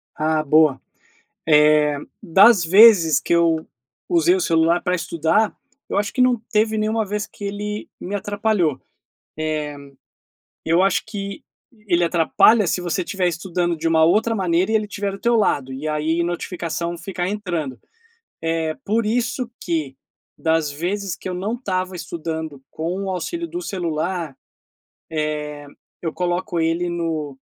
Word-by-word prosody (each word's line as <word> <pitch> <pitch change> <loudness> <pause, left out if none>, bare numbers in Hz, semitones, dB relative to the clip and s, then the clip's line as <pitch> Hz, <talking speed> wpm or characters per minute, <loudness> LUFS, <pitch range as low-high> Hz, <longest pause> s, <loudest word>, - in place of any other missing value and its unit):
Ah, 155 0 0
boa, 150 -2 +4 0.7
eh, 150 -1 +4 0.2
das 195 +1 +6
vezes 185 -4 +7
que - - 0
eu 165 -2 +2 0.4
usei 350 0 +4
o 375 - 0
celular 165 - +2
pra 180 -1 0
estudar, 170 +4 +1 0.3
eu - - -2
acho 205 0 -1
que 255 - -2
não 250 -3 +3
teve 215 0 +2
nenhuma 215 +1 0
vez 210 +1 -3
que 205 - -11
ele 210 +1 -4
me 195 - -5
atrapalhou, 205 -6 0 1.9
eh, 160 - -1
eu 175 - +5
acho 195 - +2
que 200 -3 -6 0.4
ele 175 -2 +3
atrapalha 175 +5 +4
se - - 0
você 175 +1 -1
estiver 180 +1 -1
estudando 175 0 -1
de 165 +1 -2
uma 160 -1 +4
outra 220 +6 +2
maneira 185 +1 +1
e - - +2
ele 215 -1 +1
tiver 200 0 -3
do 195 - -8
teu 235 0 +2
lado, 140 - +1
e 140 +4 -5
aí 155 +2 0
notificação 170 -1 -3
ficar 180 -1 -4
entrando, 175 -10 -3 0.6
eh, 165 -1 -1
por 220 +2 +1
isso 240 +2 -1
que 155 -6 -2 0.4
das 160 -2 +1
vezes 180 +5 -3
que - - -8
eu - - -3
não 190 +5 -3
estava 185 -6 -3
estudando 160 -4 -5
com 175 +5 -3
o 195 - -3
auxílio 335 - -3
do 350 +2 -5
celular, 170 - -3 1.5
eh, - - -13
eu 160 - -1
coloco 180 +1 -2
ele 165 +2 0
no 160 -5 -3
175 Hz, 150 wpm, -21 LUFS, 160-205 Hz, 1.9 s, vezes